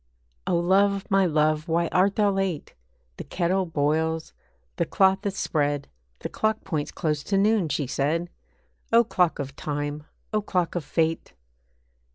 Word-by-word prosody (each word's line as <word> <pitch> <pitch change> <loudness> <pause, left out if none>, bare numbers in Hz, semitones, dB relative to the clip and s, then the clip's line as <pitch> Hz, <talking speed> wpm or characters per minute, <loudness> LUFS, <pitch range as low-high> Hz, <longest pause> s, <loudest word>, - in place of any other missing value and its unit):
'O - - +2
love, 195 +3 +2
my 195 -1 +4
love, 155 0 +1
why 170 +1 +1
art 190 +2 +2
thou 205 -2 +3
late? 195 -5 -2 0.4
The - - -5
kettle 185 +1 0
boils, 160 +1 0 0.4
the - - +1
cloth 190 0 +3
is 195 0 -3
spread, 145 -2 0 0.3
The - - -3
clock 220 0 -1
points 155 -6 -3
close 150 -2 -1
to 200 - +1
noon,' 205 -4 +2
she 145 0 -1
said. 155 +7 -1 0.6
O 230 +1 +6
clock 180 -7 +1
of 135 -1 -5
time! 145 0 -4 0.3
O 215 - +2
clock 180 -4 -1
of 175 - -2
fate! 160 +3 -1
170 Hz, 155 wpm, -25 LUFS, 150-195 Hz, 0.6 s, O